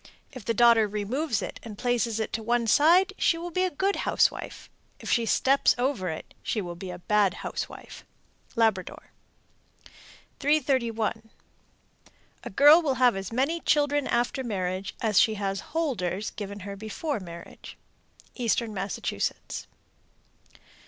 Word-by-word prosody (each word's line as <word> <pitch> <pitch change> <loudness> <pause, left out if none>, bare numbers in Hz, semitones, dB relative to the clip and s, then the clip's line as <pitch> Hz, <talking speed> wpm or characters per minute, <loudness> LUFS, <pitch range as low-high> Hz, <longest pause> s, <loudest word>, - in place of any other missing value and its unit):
If 255 -5 -10
the 230 - -1
daughter 235 -1 +5
removes 215 - -2
it - - -6
and 215 -3 -9
places 240 -2 0
it 220 +1 -2
on - - -9
one 235 +1 +1
side, 345 - +5
she 330 - +3
will 345 +1 -6
be 370 +2 +1
a - - 0
good 385 +5 -1
housewife; - - 0 0.3
if - - -5
she 235 -2 +2
steps 275 +4 +3
over 245 -7 -1
it, 160 - -7
she 220 - -2
will 175 -4 -4
be 180 +2 -8
a 180 - -6
bad 205 +1 +2
housewife. - - -6 0.5
Labrador. 220 -5 0 1.3
331. 235 -7 0 1.1
A - - -6
girl 290 - +7
will 280 -5 0
have 250 -3 +4
as 195 +1 -5
many 275 +8 0
children 290 -2 +1
after 245 +3 0
marriage 190 -4 -3
as 215 -4 +3
she 220 - +3
has 195 -1 -2
"holders" 215 - -2
given 205 -1 -7
her 200 +1 -6
before 220 +7 -4
marriage. 170 -2 -11 0.6
_Eastern 235 -2 0
Massachusetts. 195 -1 -4
230 Hz, 140 wpm, -27 LUFS, 200-275 Hz, 1.3 s, girl